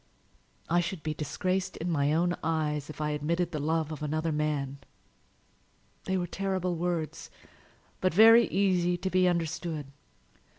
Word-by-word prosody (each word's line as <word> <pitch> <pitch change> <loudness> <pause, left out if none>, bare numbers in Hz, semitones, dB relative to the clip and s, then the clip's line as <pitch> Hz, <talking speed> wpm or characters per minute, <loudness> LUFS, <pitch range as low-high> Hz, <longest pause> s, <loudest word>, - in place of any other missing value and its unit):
"I 175 +1 +3
should 175 -1 -3
be 155 - -2
disgraced 185 +5 -2
in 170 +2 -2
my 145 -2 +2
own 175 +3 +2
eyes 155 -2 -1
if 155 - -9
I 150 0 -1
admitted 170 +4 -1
the 155 - -3
love 160 +1 0
of 155 - -6
another 155 +2 -1
man!" 150 -2 -2 1.3
They 190 0 0
were 180 - -1
terrible 185 0 -2
words, 170 -2 -3 0.7
but 185 - +2
very 225 +5 +7
easy 180 -3 +1
to 190 +1 -3
be 185 0 +4
understood. 165 -3 -2
165 Hz, 145 wpm, -29 LUFS, 150-180 Hz, 1.3 s, very